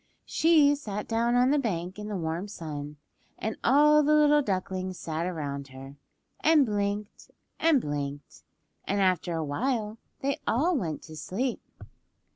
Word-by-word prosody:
She 310 -3 +4
sat 210 -8 -5
down 235 +1 +1
on 250 +2 +4
the 295 - +3
bank 185 -5 -3
in 210 - -6
the 210 -2 -3
warm 165 +3 -3
sun, 150 -6 -7 0.4
and 220 0 -3
all 300 +4 +6
the 300 +1 +3
little 295 0 +5
ducklings 185 -4 -3
sat 165 +1 -3
around 140 -5 -4
her, 135 +1 -11 0.4
and 310 -3 +5
blinked 205 -1 -3 0.3
and 320 -4 +4
blinked, 145 - -5 0.4
and 200 +1 0
after 180 -3 +1
a 160 -1 -2
while 220 - -2 0.2
they 280 +2 -1
all 320 +10 +2
went 165 - -3
to 155 - -11
sleep. 230 - -3
205 Hz, 150 wpm, -28 LUFS, 165-270 Hz, 0.4 s, all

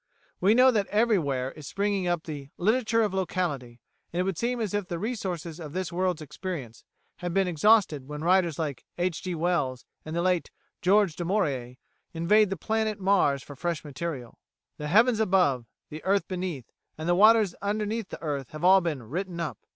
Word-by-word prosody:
We 200 +4 +4
know 255 +1 +7
that 210 -4 0
everywhere 165 - +1
is 155 -3 -11
springing 200 -2 -1
up 175 -2 0
the 145 -3 -7
"literature 225 +3 +2
of 205 -3 -1
locality," 160 - -2 0.3
and 175 - -3
it - - +3
would 190 -1 -1
seem 245 +1 -1
as 215 -4 -2
if 205 -3 -1
the 175 - -3
resources 180 -6 -4
of 155 -3 -8
this 185 -1 -3
world's 180 -3 0
experience 145 - -6 0.3
had 175 -1 -4
been 195 -1 +3
exhausted 175 -5 +3
when 150 +1 -6
writers 175 -3 +3
like 150 -5 -3
Mr 175 - 0
H. 180 -3 -1
G. 180 -2 -3
Wells 155 -7 -1 0.2
and 155 +1 -6
the 170 - 0
late 180 -2 +1 0.3
George 195 -3 +3
Du 175 - -4
Maurier 140 - -1 0.4
invade 205 +5 +4
the 195 - -3
planet 220 +3 -1
Mars 185 -8 +2
for 145 - -10
fresh 170 +2 -3
material. 145 -4 -6 0.4
The 150 - -5
heavens 225 +7 +4
above, 180 - +2 0.2
the 155 +1 -7
earth 195 +1 +1
beneath, 180 - -4 0.3
and 160 +1 -5
the 175 - +4
waters 215 0 +5
under 210 +1 -1
the 220 +1 -2 0.2
earth 140 -5 -3
have 155 +2 -7
all 190 +1 +7
been 155 -7 -3
"written 175 - -4
up." 165 -2 -3
180 Hz, 190 wpm, -27 LUFS, 155-200 Hz, 0.4 s, know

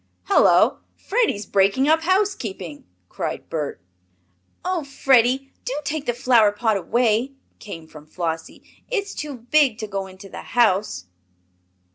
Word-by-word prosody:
"Hullo! 400 - +4 0.2
Freddie's 410 - 0
breaking 200 +8 +2
up 320 +1 +4
housekeeping!" 320 - -1 0.2
cried - - -5
Bert. 150 - -3 0.9
"Oh, 365 -3 -1
Freddie! 270 -1 +2
do 270 +3 -3
take 305 -1 -3
the 240 - +1
flower 240 -4 +4
pot 220 +1 0
away!" 235 +6 +1 0.3
came 165 -6 -9
from 155 -1 -14
Flossie. 165 -1 -4 0.3
"It's 405 -5 -2
too 295 -2 -5
big 245 0 +2
to 225 - -4
go 195 -2 -4
into 190 +1 -12
the - - -8
house." 200 - +1
235 Hz, 130 wpm, -22 LUFS, 195-285 Hz, 0.9 s, Hullo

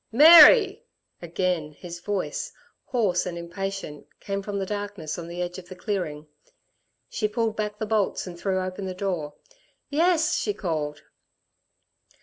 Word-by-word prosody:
"Mary!" 345 - +8 0.4
Again 175 -3 -2
his 175 +2 -9
voice, 200 +1 -3 0.3
hoarse 205 -8 0
and 175 -1 -5
impatient, 180 -2 -6
came 200 0 -4
from 200 0 -5
the 195 - -2
darkness 205 -6 -5
on 170 - -7
the 175 +1 -4
edge 180 +1 -6
of 180 - -14
the 185 - -8
clearing. 175 -7 -4 0.8
She 215 - -1
pulled 220 +1 -1
back 210 -1 -3
the 215 - -3
bolts 210 -2 0
and 180 -2 -8
threw 190 +2 -1
open 185 +1 -5
the 185 - -5
door. 175 -6 -3 0.6
"Yes," 325 +1 +2
she 415 - -2
called. 155 -5 -3
195 Hz, 145 wpm, -25 LUFS, 175-215 Hz, 0.8 s, Mary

